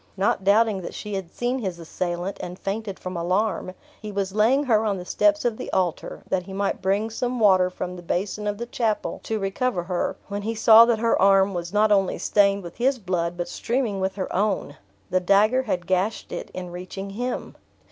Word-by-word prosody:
Not 195 0 +1
doubting 205 0 +3
that 170 - -7
she 210 - -6
had 190 -3 -4
seen 245 +2 -1
his 190 -7 -3
assailant, 175 +3 -4
and 180 +1 -6
fainted 200 0 -4
from 185 0 -6
alarm, 185 +2 -1 0.3
he 210 -1 -6
was 195 -1 -2
laying 230 +7 +3
her 225 -5 +3
on 205 -3 0
the 180 - -7
steps 305 +6 +2
of 235 -2 0
the - - -6
altar, 180 -3 -2
that 190 - 0
he 190 +2 -10
might 200 +1 -1
bring 200 +4 0
some 245 +2 -2
water 185 -4 +5
from 180 0 -5
the 180 - -9
basin 195 +4 -2
of 205 0 -1
the 235 - -4
chapel 225 -3 -2
to 220 - -1
recover 195 0 -1
her, 175 0 -2
when 205 0 -4
he 225 +2 -3
saw 225 +1 +8
that 235 -1 +2
her 230 +1 +1
arm 195 0 +5
was 175 -1 -4
not 210 +1 +3
only 195 -2 +2
stained 200 -1 +2
with 170 -1 -10
his 260 +2 +2
blood, 175 -5 -2
but 175 - -3
streaming 230 -5 -2
with 190 0 -1
her 190 -2 -4
own. 195 -7 0 0.4
The 185 - +3
dagger 210 +7 +4
had 185 -8 -2
gashed 190 +4 -1
it - - -5
in 180 -1 -7
reaching 185 +2 -7
him. 245 +5 -4
200 Hz, 210 wpm, -24 LUFS, 185-220 Hz, 0.4 s, saw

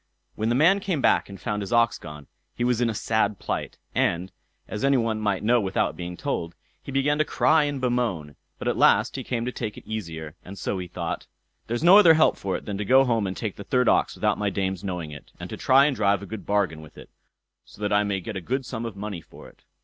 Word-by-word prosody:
When 110 +1 -1
the 120 - +2
man 170 +9 +5
came 190 -6 -2
back - - +2
and 100 -1 -9
found 105 -1 -3
his 100 - -6
ox 115 -1 +3
gone, 75 -1 -10 0.3
he 120 - -2
was 125 -1 +1
in 120 - +2
a - - -1
sad 105 -1 0
plight, - - -4 0.2
and, 90 +2 0 0.4
as 105 - -5
any 140 0 +4
one 115 -2 -1
might 100 -3 0
know 120 +2 +3
without 95 -1 0
being 90 0 -6
told, 85 -12 -3 0.3
he - - -8
began 140 +2 +1
to - - +5
cry 155 0 +3
and 145 -2 -2
bemoan; 120 - -1 0.2
but - - -5
at - - 0
last - - +4
he - - -4
came 120 -1 -2
to 125 - -2
take 110 -4 -5
it - - -12
easier, 80 -8 -6
and 100 +2 -10
so 95 - -2
he 90 - -5
thought: 85 -1 -5 0.4
"There's 120 +6 -2
no 185 +4 +9
other 165 -6 +7
help 155 - +4
for 95 -1 -3
it - - -12
than 100 -1 -4
to - - -1
go 130 +6 +5
home 115 -5 +1
and 95 - -5
take 110 -4 -4
the 100 - -7
third 125 +3 +1
ox - - +3
without - - 0
my 105 -1 +1
dame's 95 -2 -2
knowing 90 -5 -4
it, 75 - -11
and - - -7
to - - -4
try 135 +2 +5
and 145 -2 +1
drive 100 -2 +1
a - - -6
good 110 +1 -8
bargain 100 -6 0
with 75 - -15
it, - - -13 0.5
so - - -18
that 105 -1 -1
I 105 0 +4
may 100 -2 -2
get 105 +4 -6
a 95 - -3
good 130 +8 -2
sum 115 0 -5
of 110 - -8
money 100 -3 -5
for - - -14
it." - - -26
105 Hz, 260 wpm, -25 LUFS, 95-125 Hz, 0.5 s, no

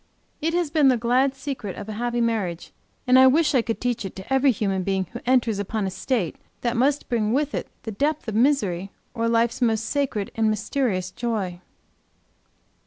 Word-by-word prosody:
It 325 +2 0
has 345 -4 0
been 300 -3 +4
the 255 -2 +4
glad 255 +4 +2
secret 265 -8 -5
of 205 - -8
a 215 - -5
happy 240 +2 -1
marriage, 205 -7 -1 0.3
and 255 +1 +6
I 260 - +8
wish 295 +4 +3
I 255 - +4
could 225 -1 -3
teach 245 -2 -1
it 195 - -6
to 190 +7 -5
every 270 +1 +4
human 195 -5 0
being 190 0 0
who 240 - -5
enters 240 -5 +2
upon 205 +1 -2
a 190 - -2
state 190 - -2 0.2
that 240 0 0
must 275 +4 +1
bring 225 -3 0
with 295 +2 0
it - - -3 0.2
the 225 - -5
depth 290 +6 -1
of 220 - -2
misery, 210 -7 +1 0.2
or 230 -1 0
life's 230 +1 +1
most 225 -2 +2
sacred 270 -8 -1
and 220 -1 +1
mysterious 210 -3 -1
joy. 200 -7 -3
235 Hz, 195 wpm, -24 LUFS, 205-265 Hz, 0.3 s, I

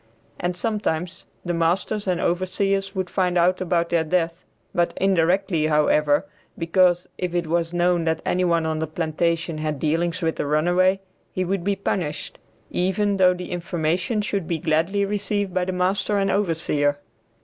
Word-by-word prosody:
And 175 0 -2
sometimes 185 -6 -2 0.2
the 175 - -1
masters 180 +5 0
and 180 -2 +1
overseers 195 +3 0
would 185 -1 -1
find 180 -1 0
out 180 +2 +3
about 170 -2 0
their 170 -1 +2
death, 165 +1 -1 0.3
but 175 0 +1
indirectly, 185 -2 +2
however, 150 -1 +3 0.3
because 175 +1 +2
if 180 -1 -2
it 175 -1 0
was 165 +1 0
known 175 -1 +1
that 160 0 -1
any 185 +1 +1
one 170 -2 +2
on 160 -1 -1
the 160 - -2
plantation 165 0 -1
had 155 -1 -2
dealings 165 +4 0
with 160 0 0
the - - -2
runaway, 175 +5 +2 0.3
he 185 - -2
would 190 0 -1
be 200 +1 +1
punished, 175 -6 -3 0.3
even 195 +3 +1
though 180 -1 +5
the 180 0 -7
information 175 +4 -1
should 200 -5 -2
be 170 - -1
gladly 165 +6 +1
received 205 -1 -2
by 185 -1 +1
the 185 - -2
master 185 +3 0
and 195 0 +1
overseer. 155 -6 +1
175 Hz, 165 wpm, -23 LUFS, 165-190 Hz, 0.3 s, though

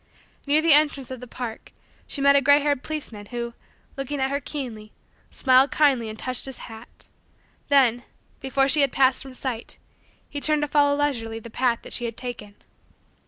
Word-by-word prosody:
Near 300 +2 +3
the 330 -2 +6
entrance 290 -3 +3
of 260 - -6
the 250 - -10
park, 235 -2 -7 0.4
she 280 - -5
met 280 0 +5
a 280 - +5
gray 285 +2 +6
haired 285 -2 0
policeman 240 -10 -6
who, 235 0 -5 0.4
looking 275 +1 -4
at 265 0 0
her 280 - 0
keenly, 235 -8 -7 0.4
smiled 260 +1 +4
kindly 265 -7 +2
and 215 - -8
touched 255 +2 -2
his 265 -2 -5
hat; 225 +1 -12 0.6
then, 255 -4 +4 0.4
before 270 0 +2
she 295 +2 +4
had 275 -2 +2
passed 260 -1 +3
from 265 -1 -10
sight, 250 -3 -5 0.5
he 285 - -6
turned 305 0 +2
to - - 0
follow 285 -1 +3
leisurely 235 -6 -1
the 225 0 -10
path 245 -1 0
that - - -6
she 240 - -2
had 230 -1 -5
taken. 240 -5 -7
265 Hz, 185 wpm, -24 LUFS, 235-285 Hz, 0.6 s, the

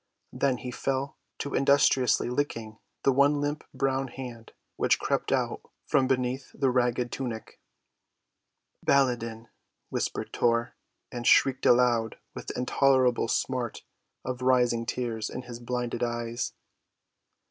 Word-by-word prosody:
Then 135 -2 +1
he 125 - -6
fell 135 +2 -2 0.2
to 140 - -4
industriously 140 -2 +3
licking 115 -4 -3 0.2
the 135 - +5
one 140 +2 +4
limp 145 +1 -2
brown 135 0 0
hand 120 -3 -9 0.2
which - - +3
crept - - -1
out - - 0 0.2
from 130 - +2
beneath 130 0 -1
the 135 -2 +2
ragged 125 -1 +1
tunic. 120 -4 -5 1.2
"Baladan," 115 -4 +1 0.4
whispered - - -3
Tor, 115 0 +1 0.4
and 120 -1 -3
shrieked 135 -1 +4
aloud 120 -2 +3 0.2
with - - -8
the - - -5
intolerable 130 -1 +3
smart 125 0 -2 0.4
of 125 0 -4
rising 125 -2 +2
tears 115 -3 -2
in 125 - -6
his 120 -1 -8
blinded 120 -1 -3
eyes. 120 0 -2
125 Hz, 125 wpm, -28 LUFS, 120-135 Hz, 1.2 s, the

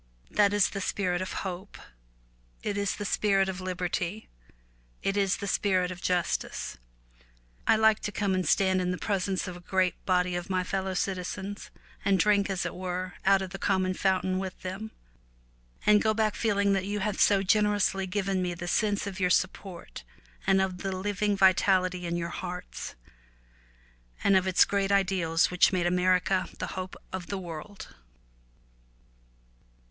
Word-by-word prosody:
That 205 -1 +4
is 205 -1 +3
the 195 - -4
spirit 180 -2 -1
of 185 - -4
hope, 190 +2 -6 0.9
it 205 - -2
is 200 0 -1
the 205 - -5
spirit 195 -1 +2
of 190 -1 -4
liberty, 180 +2 -3 0.7
it 195 - 0
is 200 -1 +2
the - - -5
spirit 185 -2 +1
of 180 -1 -8
justice. 175 - -1 0.9
I - - +6
like 220 -1 +4
to 210 - -4
come 200 -2 0
and 185 -3 0
stand 190 -1 +3
in 180 - -1
the 180 - -1
presence 195 -1 -1
of 180 - -6
a - - -9
great 185 +1 0
body 180 -1 +2
of 175 +1 -4
my 185 -1 +1
fellow 190 0 -2
citizens, 190 +1 -3 0.3
and 195 -1 +3
drink, 200 +2 +3
as 190 -1 -1
it - - -3
were, 185 0 -4
out 195 0 +4
of 185 - -7
the 195 - -7
common 185 -2 +1
fountain 185 0 +1
with 190 -1 -5
them 190 +4 -5 1.0
and 210 0 +6
go 220 0 +2
back 215 -1 +1
feeling 200 -3 +1
that 190 -1 0
you 205 +1 -2
have 210 0 -1
so 200 -1 +4
generously 205 -1 +2
given 195 0 -1
me 175 -1 -2
the 175 +1 -6
sense 205 +2 +1
of 195 -1 -6
your 180 -1 +2
support 185 0 -2 0.4
and 195 0 +5
of 190 -1 -1
the 190 +1 -3
living 205 +1 0
vitality 185 -2 +3
in 170 0 -1
your 170 0 -3
hearts, 180 +1 -6 1.3
of 190 -1 +4
its 185 - +5
great 200 -1 0
ideals 185 -5 +2
which 180 - +4
made 180 -2 0
America 180 +1 +2
the - - -4
hope 185 0 -5 0.2
of 185 -2 -5
the 200 - -3
world. 180 +2 -8
190 Hz, 165 wpm, -28 LUFS, 180-200 Hz, 1.3 s, I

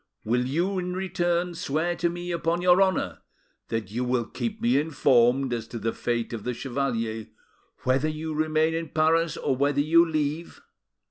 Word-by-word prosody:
Will 125 +3 +1
you, 175 +8 0
in 180 0 -3
return, 175 -1 -1
swear 165 +1 -1
to 170 +1 +1
me 175 +1 -5
upon 170 +1 -1
your 180 +1 +5
honour 190 -1 +1 0.5
that 110 -4 -3
you 120 +3 -2
will 125 -1 0
keep 220 - -4
me 235 -7 +3
informed 130 -4 +3
as 115 -1 -4
to 120 - -6
the 115 0 -2
fate 120 -1 -2
of 110 -3 -5
the 125 -1 -3
chevalier, 115 -5 -2 0.6
whether 135 +4 +2
you 155 +1 -4
remain 155 +1 +1
in 165 -1 -3
Paris 160 +1 +2
or 135 - 0
whether 140 +2 +1
you 165 +3 +5
leave? 155 0 -2
155 Hz, 175 wpm, -26 LUFS, 125-170 Hz, 0.6 s, your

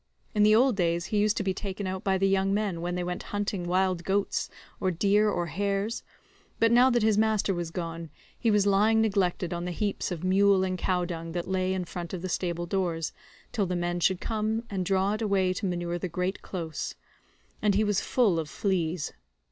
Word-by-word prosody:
In 210 - +2
the 215 +1 +6
old 250 +1 +4
days 170 -2 0
he 210 - +3
used 210 +1 +2
to - - 0
be 190 -1 0
taken 195 +1 -5
out 185 0 -3
by 190 -1 +2
the 195 +1 +2
young 195 0 +2
men 200 -5 -1
when 175 +1 -2
they 180 - -1
went 180 0 -3
hunting 205 -3 -2
wild 185 -1 +1
goats, 195 +2 0 0.3
or 185 - +1
deer, 205 +4 +3
or 175 -4 -1
hares, 200 +6 -1 0.6
but 230 0 +4
now 245 +2 +6
that 240 -3 +2
his 215 -1 +3
master 215 -2 +2
was 175 -2 -3
gone 165 -1 -5 0.3
he 230 - 0
was 210 -2 +3
lying 210 +3 +4
neglected 190 -5 +1
on 175 0 -3
the 180 - -3
heaps 200 +3 -2
of 175 -1 -4
mule 195 +1 +4
and 185 -1 -2
cow 180 0 0
dung 165 -2 -5
that 175 -1 -3
lay 185 0 0
in 185 -1 -1
front 175 +1 -5
of 175 - -7
the 185 - -3
stable 175 -1 -2
doors 170 -3 -1 0.4
till 205 -5 0
the 180 - -1
men 175 0 -1
should 185 +1 +2
come 220 +1 -1
and 185 -3 -2
draw 195 +1 +2
it 215 - -3
away 195 -4 +2
to 195 - -3
manure 175 -1 -2
the 180 - -3
great 180 +3 -2
close; 165 -5 -5 0.7
and 210 -2 +3
he 215 - +3
was 205 -2 +1
full 210 -10 +2
of 155 -2 -4
fleas. 175 -3 -1
190 Hz, 220 wpm, -28 LUFS, 175-205 Hz, 0.7 s, the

